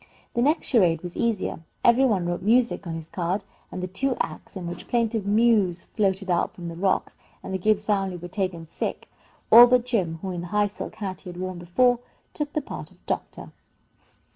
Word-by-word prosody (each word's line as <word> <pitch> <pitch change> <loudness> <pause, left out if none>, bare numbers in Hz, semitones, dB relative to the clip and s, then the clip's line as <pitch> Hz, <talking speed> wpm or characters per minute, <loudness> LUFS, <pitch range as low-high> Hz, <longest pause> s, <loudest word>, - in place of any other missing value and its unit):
The 235 - +1
next 300 +6 +2
charade 175 - +3
was 175 -1 -7
easier. 220 -7 -1 0.2
Every 245 +3 +6
one 200 -8 +1
wrote 175 0 -2
"music" 230 -2 +2
on 165 - -3
his 160 -1 -7
card, 180 +4 -2 0.2
after 185 - -6
the 185 - -2
two 255 +8 -1
acts - - -5
in 185 -2 -5
which 175 0 -7
plaintive 225 -3 0
mews 205 -5 +3
floated 195 -2 0
up 175 - 0
from 170 -1 -6
the 165 - -7
rocks 190 +2 0 0.3
and - - -6
the 190 - -1
Gibbs 210 +2 +2
family 195 -3 0
were 175 +1 -8
taken 185 -3 -3
sick. 160 - -4 0.4
All 240 +1 +11
but 250 -1 +3
Jim, 190 -10 0
who, 190 - -3
in 175 -1 -4
the 175 - -6
high 210 +3 +2
silk 205 - -6
hat 190 -3 -5
he 185 - -9
had 175 - -9
worn 185 -1 -4
before, 245 +8 +2 0.3
took 295 -1 -4
the 305 - -1
part - - -7
of - - -25
doctor. - - -4
195 Hz, 210 wpm, -25 LUFS, 175-230 Hz, 0.4 s, All